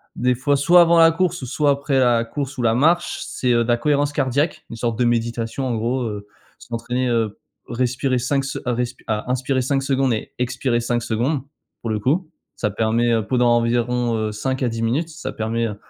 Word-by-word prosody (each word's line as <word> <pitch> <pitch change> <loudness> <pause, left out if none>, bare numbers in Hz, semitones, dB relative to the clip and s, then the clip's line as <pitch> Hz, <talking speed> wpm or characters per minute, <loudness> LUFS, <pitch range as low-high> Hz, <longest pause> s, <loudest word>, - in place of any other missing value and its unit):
des 125 0 +2
fois 140 +3 +1
soit 175 +6 +6
avant 170 0 +5
la 165 0 +7
course, 175 -4 -1
soit 145 +4 +1
après 140 -1 0
la 120 -2 +3
course 140 +3 -5
ou - - -2
la 115 -1 +3
marche, 165 +7 +2
c'est, 125 -1 0
heu, 120 0 +3
de - - -6
la 120 - +4
cohérence 145 +3 +1
cardiaque, 140 +5 0
une - - -6
sorte 115 -1 -2
de 125 - +3
méditation 120 +2 -1
en 120 - -1
gros, 120 +4 -1
heu, 105 -2 -5 0.3
s'entraîner 120 +2 -3
po 120 - +1
heu, 110 -3 -1 0.3
respirer 125 +2 0
5 135 +2 0
se 140 - -4
respirer 125 0 -3
à 110 +2 -2
inspirer 130 +1 0
5 135 +1 0
secondes 135 -2 +1
et 110 - -4
expirer 125 -1 0
5 120 0 -1
secondes, 125 +6 0 0.4
pour 115 - -4
le 105 - -1
coup. 155 - 0 0.3
Ça 105 - -1
permet 115 +2 +1
pendant 125 +1 +2
environ, 120 0 0
heu, 110 -1 -1
5 130 +5 -2
à 125 - +2
10 115 0 -4
minutes, 140 +9 0
ça 155 -4 -6
permet, 115 0 -1
heu, 105 - -5
125 Hz, 210 wpm, -21 LUFS, 115-135 Hz, 0.4 s, la